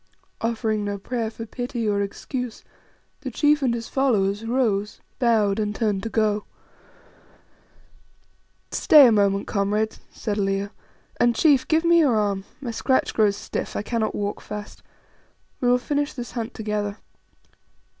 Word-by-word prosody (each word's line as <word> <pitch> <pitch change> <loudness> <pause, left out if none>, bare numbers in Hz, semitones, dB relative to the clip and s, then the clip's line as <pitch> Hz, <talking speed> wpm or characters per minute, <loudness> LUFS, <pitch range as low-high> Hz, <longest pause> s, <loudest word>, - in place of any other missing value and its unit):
Offering 220 -2 -1
no 205 0 -2
prayer 230 +2 -3
for 225 0 -8
pity 245 0 -4
or 200 -1 +1
excuse, 240 +4 -5 0.6
the 275 - -5
chief 295 +4 +2
and 260 -3 +2
his 230 -1 -5
followers 210 -6 +1
rose, 215 -5 0 0.2
bowed, 220 -5 +2
and 210 -1 -1
turned 210 -4 0
to 225 - -4
go. 215 -2 +1 2.3
"Stay 295 -3 +7
a 240 - +6
moment, 200 -2 +2
comrades," 210 +2 -1
said 210 -2 -3
Leo, 195 0 -1 0.5
"and, 240 -1 +3
chief, 285 -5 +4
give 320 +1 +2
me 340 0 +6
your 280 -8 +4
arm; 200 -2 0
my 255 -4 -4
scratch 260 +3 +1
grows 210 -2 +3
stiff; - - -5
I - - -2
cannot 220 -1 -1
walk 205 0 -3
fast. 210 0 -8 0.8
We 250 - 0
will 245 - +5
finish 290 +3 -1
this 245 -3 -6
hunt 235 -1 -5
together." 210 -2 -3
220 Hz, 145 wpm, -24 LUFS, 205-250 Hz, 2.3 s, Stay